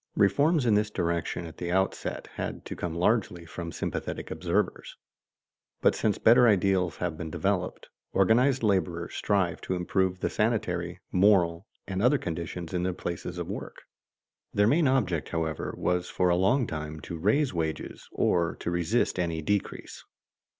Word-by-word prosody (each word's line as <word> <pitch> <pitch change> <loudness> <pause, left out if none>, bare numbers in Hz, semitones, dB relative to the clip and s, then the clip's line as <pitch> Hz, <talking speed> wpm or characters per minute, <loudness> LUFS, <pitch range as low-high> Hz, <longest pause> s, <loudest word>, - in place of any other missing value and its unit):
Reforms 140 - +3
in 115 - +4
this 105 +1 +2
direction 85 -3 -2
at 80 - -10
the 85 0 -3
outset 95 +1 -1
had - - -5
to - - -6
come 85 -2 -4
largely 90 -2 +1
from 85 0 -6
sympathetic - - -4
observers. - - -1 0.8
But - - +4
since 105 -2 0
better 120 +2 +6
ideals 95 -4 +2
have 85 -3 -3
been 80 - -4
developed, - - -2 0.2
organized 120 +7 +3
laborers 90 -5 0
strive 95 -4 0
to 95 - -2
improve 90 +1 0
the - - +1
sanitary, 90 -6 -1
moral, 90 -2 +3 0.2
and 95 0 -3
other 125 +6 +4
conditions 85 -2 -5
in 90 - 0
the 90 0 0
places 85 -1 -5
of - - -4
work. - - -7 0.7
Their 105 - +4
main 145 +7 +4
object, 95 - +1
however, 80 -2 -2
was 90 0 0
for 90 -1 +1
a 85 - +4
long 105 +9 +3
time 75 -3 -5
to 85 - -6
raise 130 - +2
wages, 80 -2 -4
or 85 -1 +1
to 85 - -4
resist 85 +5 +1
any 85 -3 -1
decrease. 105 +3 -2
90 Hz, 155 wpm, -28 LUFS, 85-105 Hz, 0.8 s, better